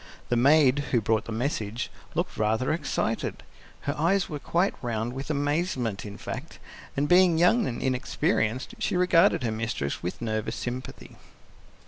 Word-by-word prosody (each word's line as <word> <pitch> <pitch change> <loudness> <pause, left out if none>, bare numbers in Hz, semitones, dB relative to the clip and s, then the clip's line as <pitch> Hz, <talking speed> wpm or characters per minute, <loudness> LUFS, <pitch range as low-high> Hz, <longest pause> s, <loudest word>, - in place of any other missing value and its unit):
The 120 - +2
maid, 140 +2 +5
who 120 - +3
brought 110 0 0
the - - -6
message, 115 -1 -2 0.2
looked - - -1
rather 110 +6 +1
excited; 115 -8 -2 0.4
her 145 - -2
eyes 180 +5 +2
were 150 -3 -4
quite 175 +7 +1
round 115 -1 -2
with 135 +3 -6
amazement, 145 - -1
in 100 0 -8
fact, 130 +8 -7 0.4
and 145 +1 +2
being 180 -1 +5
young 190 +7 +4
and 120 - -3
inexperienced, 130 - 0
she 195 - 0
regarded 180 -6 +4
her 115 - 0
mistress 110 - -3
with 90 - -4
nervous 110 0 -2
sympathy. 125 +1 -6
130 Hz, 150 wpm, -27 LUFS, 110-155 Hz, 0.4 s, maid